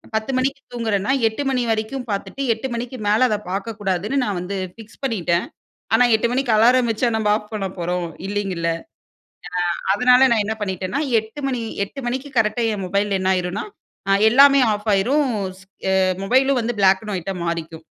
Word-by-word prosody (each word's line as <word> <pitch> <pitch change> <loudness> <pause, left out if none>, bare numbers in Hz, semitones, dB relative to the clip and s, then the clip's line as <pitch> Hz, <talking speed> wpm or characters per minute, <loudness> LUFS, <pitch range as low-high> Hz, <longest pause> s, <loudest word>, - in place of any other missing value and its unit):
10 220 +4 -1
மணிக்கு 270 +1 -1
தூங்குறேன்னா? 220 -1 -1 0.2
"8 225 +6 -3
மணி 255 -2 0
வரைக்கும் 225 +4 -2
பார்த்துட்டு 235 +7 -4
8 225 +4 -5
மணிக்கு 245 +2 -5
மேல 215 +5 +4
அத 215 - +1
பாக்கக்கூடாதுன்னு 205 +2 -2
நான் 200 -3 -2
வந்து 180 +3 -5 0.2
ஃபிக்ஸ் 225 -1 -15
பண்ணிட்டேன்." 180 -9 0 0.5
ஆனா 250 - +5
8 220 +2 +2
மணிக்கு 250 -1 0
அலாரம் 240 +3 +4
வச்சா 230 +2 +1
நம்ப 220 -1 0
ஆஃப் 210 -1 -8
பண்ண 205 -3 -2
போறோம்? 175 0 -2 0.2
இல்லைங்கல்ல? 195 -4 -2 1.1
அ - - -13
அதனால 250 +3 +5
நான் 225 -3 +3
என்ன 220 - -2
பண்ணிட்டேனா, 190 +5 -2 0.2
8 220 +6 -6
மணி, 250 -3 -2 0.2
8 275 +7 -9
மணிக்கு 260 +3 -3
கரெக்ட்டா 225 +2 +1
என் 195 - -5
மொபைல் 200 +1 0
என்ன 185 - -1
ஆயிருன்னா? 180 +2 -2 0.4
அ - - +4 0.2
"எல்லாமே 275 +3 +7
ஆஃப் 210 +2 -6
ஆயிரும்." 270 +9 +2 0.3
ஸ் - - -17 0.3
அ - - +3 0.3
மொபைலும் 260 +3 +3
வந்து 235 +1 -2
பிளாக் 190 0 +4
அண்ட் 210 -2 -4
ஒயிட்டா 185 +2 -4
மாறிக்கும். 165 -1 -4
220 Hz, 175 wpm, -21 LUFS, 195-250 Hz, 1.1 s, எல்லாமே